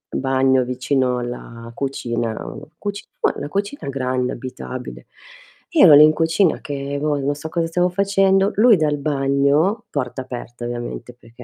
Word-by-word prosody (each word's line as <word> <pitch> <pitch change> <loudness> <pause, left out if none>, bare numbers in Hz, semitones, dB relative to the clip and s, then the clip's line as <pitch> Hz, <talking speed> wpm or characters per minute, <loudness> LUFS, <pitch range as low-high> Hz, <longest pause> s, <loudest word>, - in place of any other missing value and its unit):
bagno 130 -1 +2
vicino 125 0 0
alla 115 -1 -7
cucina, 120 -4 -3
uhm - - -8
cucina 205 -1 -6 0.3
la 145 - -5
cucina 200 - -3
grande, 130 -1 -1
abitabile. 130 0 -8 0.6
Io 325 - +6
ero 150 -4 +9
lì 150 - +9
in 155 0 +6
cucina, 165 +3 +1
che 140 -1 -4
boh, 150 -1 0
non 140 +1 0
so 160 +2 -7
cosa 170 0 -1
stavo 180 +2 +1
facendo, 195 +1 +2
lui 220 -1 +6
dal 150 -2 +1
bagno 140 - +1
porta 130 -2 -3
aperta, 120 -1 -8
ovviamente, 120 0 -6
perché 120 +1 -15
140 Hz, 150 wpm, -20 LUFS, 125-165 Hz, 0.6 s, ero